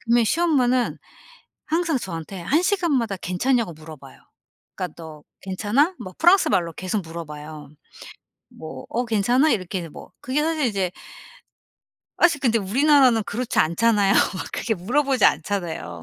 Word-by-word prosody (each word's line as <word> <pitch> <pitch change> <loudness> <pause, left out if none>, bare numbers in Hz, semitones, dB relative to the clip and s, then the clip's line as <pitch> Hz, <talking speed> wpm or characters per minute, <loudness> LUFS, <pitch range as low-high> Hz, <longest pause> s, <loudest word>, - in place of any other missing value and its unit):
그러면 235 0 +2
시엄마는 255 -4 +1 0.7
항상 330 -1 0
저한테 175 -1 -7
1 300 - +1
시간마다 310 - 0
괜찮냐고 215 +4 -1
물어봐요. 155 -3 -13 0.6
그니까 180 -4 -5
"너 160 -2 -11 0.2
괜찮아?" 215 - 0
뭐 185 - -8
프랑스 355 +4 +5
말로 170 -2 0
계속 185 +5 -3
물어봐요. 155 -3 -9 0.8
뭐 145 -5 -10
"어 245 +2 -1
괜찮아?" 240 +7 +2
이렇게 185 -4 -2
뭐 - - -12
그게 265 +4 -1
사실 315 -2 0
이제 195 -5 -1 1.3
아이씨 330 -4 +4
근데 235 -4 +2
우리나라는 255 +3 +4
그렇지 230 +4 -3
않잖아요. 200 +5 +3 0.2
막 - - -5
그렇게 220 0 -1
물어보지 260 +8 0
않잖아요 175 - -1
220 Hz, 325 characters per minute, -23 LUFS, 175-270 Hz, 1.3 s, 프랑스